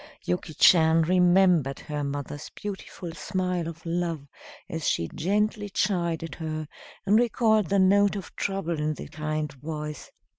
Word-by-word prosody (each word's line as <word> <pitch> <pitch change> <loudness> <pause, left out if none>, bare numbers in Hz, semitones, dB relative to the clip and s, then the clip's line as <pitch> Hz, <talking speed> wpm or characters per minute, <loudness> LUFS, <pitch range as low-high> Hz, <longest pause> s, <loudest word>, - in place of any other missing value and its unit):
Yuki 90 - -2
Chan 160 -1 +6
remembered 180 -5 +3
her 150 -1 -4
mother's 145 +1 -5
beautiful 190 -3 -6
smile 180 -2 -2
of 165 +1 -9
love 165 -4 -2 0.4
as 160 -1 -2
she 85 - 0
gently 205 +4 0
chided 170 -5 -1
her, 155 -2 -4 0.4
and 205 +3 +5
recalled 220 -4 +2
the 200 - +2
note 200 +2 +4
of 195 -4 -7
trouble 185 -5 -2
in 155 0 -1
the - - -8
kind 155 0 -3
voice. 150 +1 -6
170 Hz, 140 wpm, -26 LUFS, 155-195 Hz, 0.4 s, Chan